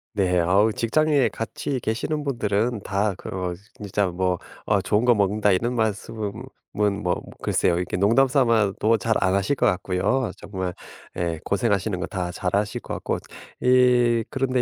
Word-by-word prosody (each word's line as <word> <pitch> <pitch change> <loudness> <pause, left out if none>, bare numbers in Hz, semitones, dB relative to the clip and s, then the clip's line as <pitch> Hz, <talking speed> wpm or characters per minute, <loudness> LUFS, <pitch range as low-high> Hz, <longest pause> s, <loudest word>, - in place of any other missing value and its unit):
네. 90 -3 +2
아 - - 0
어 110 +2 +4
직장에 145 +5 +2
같이 130 +4 -4
계시는 135 +7 -2
분들은 115 -4 -1
다 100 0 0
그 - - -8
어 90 -2 -3 0.2
진짜 100 0 -1
뭐 90 0 0 0.3
"아 105 -2 +3
좋은 105 +4 +1
거 120 -1 +5
먹는다." 105 +1 +2
이런 115 +6 +1
말씀은 110 -1 -2 0.4
뭔 105 0 0
뭐 90 -3 0 0.2
글쎄요 85 - +1
이렇게 90 0 -2
농담 115 +8 +4
삼아도 115 -4 +2
잘 110 +2 0
안 95 0 +2
하실 100 +8 +1
것 - - +1
같고요. 95 +7 +1
정말 95 -3 -5 0.4
예 85 -2 -2
고생하시는 100 -2 0
거 90 - -2
다 90 -2 -4
잘 90 +1 -2
아실 100 0 0
것 - - -7
같고 - - -2 0.4
이 125 -2 +4
그런데 130 -1 0
105 Hz, 300 characters per minute, -24 LUFS, 95-120 Hz, 0.4 s, 거